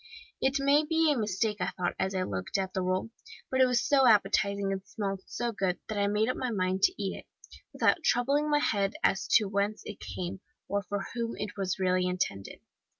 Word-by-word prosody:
It 270 +2 +2
may 280 +2 +4
be 320 0 +2
a - - -3
mistake, 210 -1 -1
thought 180 -1 -2
I, - - +2
as 190 0 -2
I 185 - +1
looked 95 - -3
at 190 -1 -2
the 190 - -1
roll, 185 +4 -1 0.4
but 260 0 +2
it 260 - +6
was 245 -1 +1
so 270 -2 +5
appetizing 200 -2 +3
and 195 0 -2
smelt 195 -2 -4
so 240 0 -2
good, 190 -4 -1
that 215 -1 -2
I 200 - +2
made 210 +2 +1
up 255 - 0
my 255 - -2
mind 190 -3 -1
to 370 - +2
eat - - -2
it, - - -15 0.4
without 340 - +2
troubling 280 +4 +2
my 295 - +4
head 200 -6 0
as 195 - +2
to 215 - +6
whence 200 +2 -1
it 210 - -8
came, 180 +1 -5 0.3
or 200 0 0
for 200 0 -4
whom 235 -1 -2
it 210 0 -5
was 190 -2 -2
really 185 -1 +1
intended. 180 - -3
200 Hz, 215 wpm, -29 LUFS, 190-240 Hz, 0.4 s, it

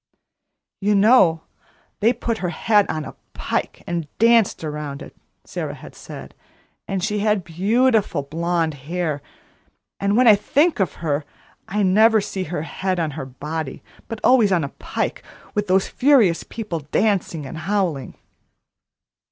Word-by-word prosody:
"You 205 +1 +2
know 195 -6 +5 0.6
they 225 +3 +4
put 235 -2 -3
her 180 - -2
head 205 +5 +2
on 155 -1 -3
a - - -8 0.2
pike - - -3
and 170 -3 -3
danced 230 -5 +3
around 150 -2 -5
it," - - -13 0.3
Sara - - -5
had - - -12
said; - - -10 0.5
"and 195 -2 -2
she 210 0 0
had 210 -2 +1
beautiful 205 - +1
blonde 165 +2 -1 0.2
hair; 165 -5 -2 0.8
and 200 +2 +1
when 250 - +5
I 220 - +10
think 290 - +1
of 190 - +1
her, 145 -1 0 0.4
I 210 +1 0
never 220 +4 +5
see 195 -2 -4
her 155 -1 -4
head 185 +3 -2
on 160 -2 -1
her 135 -1 -6
body, 150 +2 -6 0.2
but 225 - -6
always 240 -6 +5
on 175 -4 +2
a 140 - -3
pike, - - -4 0.3
with 210 0 -1
those 190 +1 +2
furious 245 -11 +3
people 210 -7 -5
dancing 165 0 0
and 145 +4 -7
howling." 170 - -1
190 Hz, 150 wpm, -21 LUFS, 160-215 Hz, 0.8 s, I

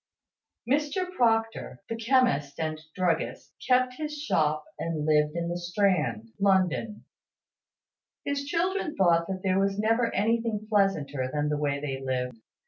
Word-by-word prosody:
Mr 300 +7 0
Proctor, 225 - 0
the 230 - -3
chemist 225 - +1
and 155 -1 -2
druggist, 180 -4 -1
kept 255 0 +3
his 300 -1 -4
shop, 155 - 0
and 160 -3 -2
lived 150 0 +3
in 170 0 -2
the 175 +1 -3
Strand, 175 - 0
London. 195 +2 +1 1.2
His 280 0 -2
children 355 +2 -1
thought 170 -3 +3
that 190 -1 -4
there 190 0 +2
was 195 0 +1
never 225 +2 +2
anything 225 +1 0
pleasanter 150 -11 +1
than 150 +1 0
the 150 - 0
way 140 -1 0
they 135 -2 -4
lived. 125 -2 -2
195 Hz, 135 wpm, -27 LUFS, 150-230 Hz, 1.2 s, kept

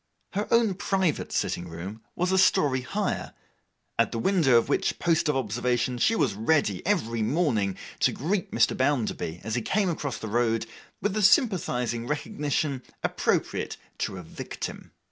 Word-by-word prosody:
Her 205 +2 -1
own 230 -4 +4
private 190 -4 0
sitting 85 - -1
room 95 +7 -7
was 180 +1 0
a 190 - +4
story 140 -7 +4
higher, 125 -2 -3 0.6
at - - +3
the - - -3
window 140 -2 +4
of 115 - +2
which - - 0
post 165 -2 +2
of 150 - +2
observation 120 +1 0
she 225 - +3
was 140 - +2
ready, 110 - +1
every 115 - +1
morning, 110 - +1 0.2
to - - +3
greet 180 +7 -1
Mr. - - +2
Bounderby, 125 - -1
as 110 +1 -4
he 120 - 0
came 195 - +1
across 140 -6 -3
the 110 - -6
road, 115 0 +1 0.4
with 205 - +1
the 215 - 0
sympathizing 160 - +2
recognition 145 -1 -1 0.2
appropriate - - 0 0.2
to 95 - -2
a 90 - -7
Victim. 80 - -7
130 Hz, 160 wpm, -27 LUFS, 115-180 Hz, 0.6 s, own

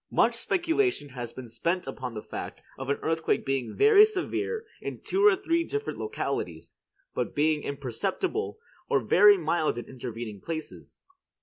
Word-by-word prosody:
Much - - +3
speculation 350 - 0
has 125 -3 -6
been 130 -2 -9
spent 170 +11 -1
upon 125 -4 -5
the 105 - -5
fact - - -7
of 135 0 -6
an 140 - +2
earthquake 160 0 0
being 135 -4 -1
very 425 0 +8
severe 435 +2 -1 0.2
in - - -5
two 390 +1 0
or 420 -2 +7
three 335 -3 +1
different 430 +5 -4
localities, 435 +1 -3 0.4
but 125 - -2
being 150 +1 +2
imperceptible 165 - -2 0.3
or - - +4
very 415 -2 +6
mild 165 - 0
in 120 - -5
intervening 115 -5 -7
places. 160 -2 -6
160 Hz, 150 wpm, -28 LUFS, -, 0.4 s, very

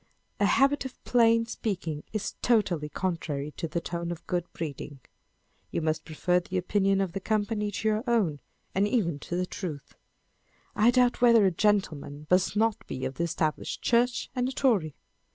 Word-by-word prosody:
A - - +4
habit 275 +2 +3
of 265 -1 -9
plain 230 -1 +4
speaking 175 -9 -4
is 215 -1 -3
totally 185 -10 +2
contrary 150 -5 -3
to 165 - -2
the 170 +2 -2
tone 170 0 -4
of 170 - -7
good 175 -1 -2
breeding. 145 -3 -6 0.7
You - - -2
must 155 0 -1
prefer 180 +3 +1
the 185 +1 -4
opinion 195 +1 +2
of 190 -3 -1
the 195 - -2
company 210 +1 -1
to 205 +2 -3
your 215 +1 +1
own, 200 -12 +1 0.3
and 200 +2 +2
even 180 - 0
to 175 +5 -2
truth. 165 -6 -6 0.8
I 215 +3 +5
doubt 245 -1 +3
whether 235 -4 +6
a 190 - +4
gentleman 165 -7 0
must 185 +2 +3
not 220 0 +1
be 130 - -4
of 135 - -3
the 170 - +1
Established 155 -2 -2
Church, 240 +1 +2
and 250 0 0
a - - -4
Tory. 215 - +1
190 Hz, 170 wpm, -28 LUFS, 165-225 Hz, 0.8 s, whether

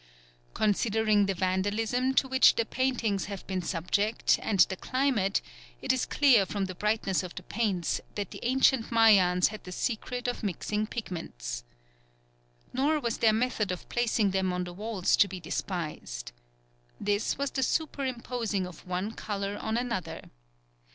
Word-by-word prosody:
Considering 215 -1 +2
the 195 - 0
vandalism 205 +7 0
to 265 - +3
which 260 0 +5
the 230 - +1
paintings 235 -6 0
have 200 -2 -7
been 190 -1 -2
subject 200 +6 +1
and 200 -4 +2
the 190 - +4
climate, 250 -4 0 0.4
it - - +1
is 260 - -1
clear 265 -8 +5
from 195 +1 -2
the 185 - -5
brightness 210 -1 0
of 180 -2 -8
the 185 - -7
paints 200 -4 -1
that 205 -3 -4
the - - -8
ancient 260 -1 +3
Mayans 195 -6 +5
had 215 0 -9
the 180 - -9
secret 245 +5 -3
of 245 - -2
mixing 210 +1 -2
pigments. - - -5 1.1
Nor 290 +4 +2
was 235 -5 -2
their 225 - +5
method 220 -3 0
of 180 - -6
placing 230 -4 +1
them 190 -1 0
on 180 0 -1
the 175 0 -7
walls 205 -1 0
to 200 - +5
be 185 -1 -7
despised. 155 - -4 0.7
This 205 +1 0
was 280 0 -1
the 265 - -1
superimposing 250 - -1
of 180 0 -11
one 185 +4 -2
colour 200 -2 -4
on 220 +1 -2
another. 240 -6 -4
210 Hz, 155 wpm, -29 LUFS, 185-235 Hz, 1.1 s, which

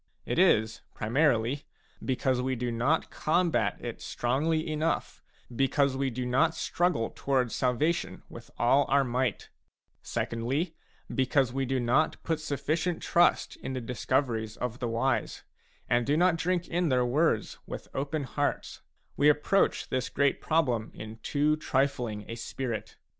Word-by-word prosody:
It - - -1
is, 110 0 +3
primarily, 125 +2 +1 0.4
because 130 -1 0
we 130 +1 -1
do 120 0 -2
not 125 +8 +1
combat 155 - +1
it 120 -2 -6
strongly 155 +7 0
enough, 155 +1 -1 0.3
because 135 +1 +2
we 135 0 0
do 125 0 -4
not 135 +7 +2
struggle 175 -10 0
towards 130 -4 0
salvation 140 +7 0
with - - -11
all 135 +4 +4
our 140 0 +4
might; 125 -2 -1 0.5
secondly, 135 +9 -2 0.4
because 130 -1 +2
we 135 -1 -1
do 130 0 0
not 125 +6 +2
put 160 -1 -1
sufficient 155 +3 -2
trust 175 0 +3
in 130 - -5
the 130 - -2
discoveries 120 -2 -1
of 125 0 -4
the 120 - -2
wise, 120 +3 -1 0.4
and 120 0 +2
do 145 +2 +3
not 180 0 +4
drink 175 +1 -1
in 175 -1 0
their 125 -2 +3
words 130 -2 +1
with - - -7
open 145 +2 -2
hearts; 145 +2 -2 0.3
we 145 - +5
approach 150 +6 +2
this 130 0 -1
great 140 0 +1
problem 125 -9 +1
in 110 +1 -8
too 145 +6 +1
trifling 125 -8 -1
a - - -5
spirit. 115 -1 -5
135 Hz, 145 wpm, -29 LUFS, 120-155 Hz, 0.5 s, we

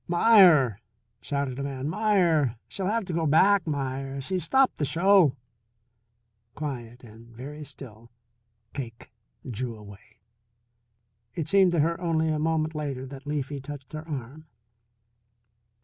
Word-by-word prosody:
"Meier," 175 - +5 0.4
shouted 140 -2 -3
a - - -3
man. 135 -1 -4
"Meier 170 - +2
she'll 190 -2 -4
have 225 0 0
to 180 - -5
go 165 -1 0
back, 190 +5 +4
Meier; 135 -2 -3
she's 180 +7 -2
stopped 265 +10 +2
the - - 0
show." 170 -1 +4 1.2
Quiet 125 -5 -6
and 115 0 -14
very 135 +6 -9
still, 115 -5 -12 0.6
Cake 115 -5 -8 0.4
drew 120 0 -4
away. 105 0 -15 1.2
It 160 -3 -3
seemed 190 +1 +4
to 165 - +3
her 165 +3 0
only 160 -2 +1
a 155 -1 0
moment 160 0 0
later 140 -4 -4
that 135 +1 -11
Leafy 145 -1 -3
touched 140 0 -9
her 155 +1 -7
arm. 145 +1 -7
145 Hz, 135 wpm, -26 LUFS, 130-165 Hz, 1.2 s, Meier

